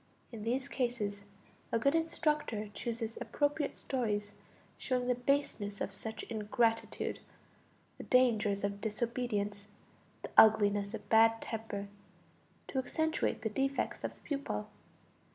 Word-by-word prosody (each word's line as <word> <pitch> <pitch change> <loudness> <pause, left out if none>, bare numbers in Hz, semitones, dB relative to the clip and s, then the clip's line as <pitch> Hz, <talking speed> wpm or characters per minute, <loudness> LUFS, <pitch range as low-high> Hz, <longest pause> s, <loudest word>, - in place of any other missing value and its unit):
In 225 -3 -7
these 250 +5 -1
cases 220 -7 -2 0.5
a - - +3
good 275 +5 +3
instructor 300 -9 0
chooses 230 -1 -4
appropriate 290 0 0
stories 210 -6 -1 0.4
showing 250 -2 -1
the 250 - +4
baseness 245 -6 0
of 195 - -3
such 220 +3 -6
ingratitude, 225 +1 0 0.8
the - - -5
dangers 215 -6 +3
of 200 0 -2
disobedience, 210 -2 -2 0.6
the - - -6
ugliness 205 -1 +6
of 210 -2 -9
bad 225 0 +6
temper, 220 -3 -4 0.8
to 265 - 0
accentuate 315 -2 0
the 220 - +1
defects 270 +5 -1
of - - -3
the - - -23
pupil. 275 - -3
225 Hz, 120 wpm, -33 LUFS, 205-255 Hz, 0.8 s, ugliness